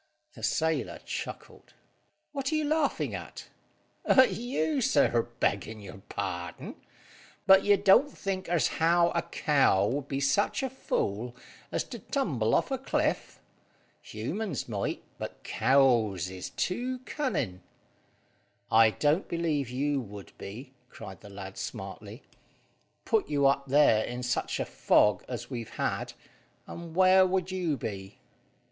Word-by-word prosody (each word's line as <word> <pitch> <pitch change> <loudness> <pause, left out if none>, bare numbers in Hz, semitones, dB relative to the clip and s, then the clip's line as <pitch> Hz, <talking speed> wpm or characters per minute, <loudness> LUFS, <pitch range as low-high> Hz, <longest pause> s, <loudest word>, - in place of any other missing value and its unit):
The - - -13
sailor 160 0 0
chuckled. - - -7 0.6
"What 275 0 -3
are - - +1
you 310 -1 +1
laughing 305 0 0
at?" - - -8 0.5
"At 260 -1 +5
you, 265 +4 -1
sir, 220 - +3
beggin' 110 +3 -1
your 100 -1 -11
pardon. - - -5 0.7
But 195 0 +7
you 205 -1 +5
don't 205 +8 +5
think 190 -8 -4
as 175 -2 +3
how 170 +1 +4
a 170 - 0
cow 135 - +2
would 135 +6 -2
be 135 -1 -2
such 200 - +1
a 265 - -2
fool 120 - -2 0.4
as - - 0
to - - -9
tumble - - 0
off - - +1
a - - -1
cliff. - - -1 0.6
Humans 180 - -4
might, 105 -4 -3 0.2
but - - -7
cows 115 -9 +2
is 95 -1 -6
too 250 +7 -2
cunning." 130 - -2 1.1
"I 110 0 +7
don't 150 - +1
believe 160 -6 -1
you 140 +2 0
would 100 -3 -11
be," 125 +7 -9 0.2
cried 95 -4 -10
the 105 - -12
lad 95 -1 -8
smartly. - - -7 0.8
"Put 220 -7 +1
you 145 -2 +2
up 140 0 +2
there 135 -6 +5
in 125 +1 -5
such 125 0 -1
a - - -1
fog 90 +11 +3
as 125 +2 -6
we've 120 -3 -5
had, - - -2 0.5
and 170 -1 -9
where 185 0 +6
would 185 0 0
you 175 -6 -1
be?" 100 -4 -6
140 Hz, 140 wpm, -29 LUFS, -, 1.1 s, But